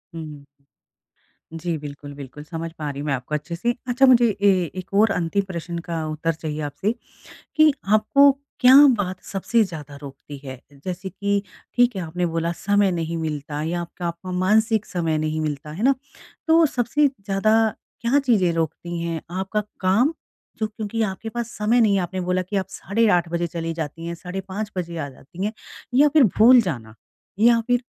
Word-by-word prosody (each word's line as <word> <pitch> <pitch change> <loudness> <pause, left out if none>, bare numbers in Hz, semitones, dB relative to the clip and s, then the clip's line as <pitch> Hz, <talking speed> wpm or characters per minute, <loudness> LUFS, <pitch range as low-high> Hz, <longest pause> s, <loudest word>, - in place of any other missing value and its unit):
हुँ। 150 -3 -8 1.2
जी, 170 -1 -2
बिल्कुल 145 -1 -9
बिल्कुल। 140 +1 -10
समझ 165 +1 -6
पा 150 - -3
रही 140 0 -6
हूँ 150 - -4
मैं 140 - +1
आपको 135 +3 -3
अच्छे 170 +3 -4
से। 235 +8 0 0.2
अच्छा 255 +2 +4
मुझे 245 -2 +6
ए 205 - +6 0.3
एक 185 +1 -7
और 210 +1 +4
अंतिम 180 +3 0
प्रश्न 170 -1 -5
का 165 -2 -2
उत्तर 155 +2 -1
चाहिए 155 -1 -5
आपसे 150 +9 -1 0.7
कि 310 -1 +6 0.2
आपको 275 +7 +6 0.3
क्या 255 +1 +8 0.2
बात 185 -2 -3
सबसे 220 +4 +1
ज़्यादा 150 -6 -8
रोकती 140 +1 -10
है? 130 -2 -8 0.2
जैसे 185 +1 -4
कि 200 +2 -1 0.3
ठीक 245 -3 +3
है 190 - -2
आपने 175 +2 -2
बोला 165 0 -1
समय 200 +3 +2
नहीं 165 -1 -2
मिलता 150 -2 -4
या 175 +2 -2
आपका 170 +1 -6
आपका 170 +2 -5
मानसिक 220 +3 +2
समय 165 -4 -1
नहीं 155 0 -1
मिलता। 150 0 -4
है 185 - -6
ना? 270 +3 +5 0.5
तो 325 +1 +5
सबसे 275 +3 +1
ज़्यादा 200 -4 -1 0.5
क्या 240 +5 +3
चीज़ें 220 -10 +2
रोकती 165 +1 -3
हैं 165 -1 -3 0.2
आपका 195 +3 -1 0.2
काम? 215 - +3 0.5
जो 220 - 0
क्योंकि 220 +1 -3
आपके 215 +1 -3
पास 235 0 -4
समय 225 +3 +3
नहीं 215 -3 +4
है - - +2
आपने 185 +2 -4
बोला 180 +1 0
कि 200 +3 -5
आप 190 -1 0
साढ़े 220 +4 0
8 175 -1 -1
बजे 170 +1 -1
चली 165 0 -4
जाती 165 +1 -5
हैं 170 - -3
साढ़े 180 +2 -6
5 205 +2 -4
बजे 170 -2 -4
आ 145 - -3
जाती 170 +7 -8
हैं 210 - -1 0.4
या 290 +3 +6
फिर 295 -2 +5
भूल 240 +3 +8
जाना? 120 - -4 0.5
या 230 +1 +6
फिर 245 0 +2
180 Hz, 185 wpm, -23 LUFS, 160-215 Hz, 1.2 s, क्या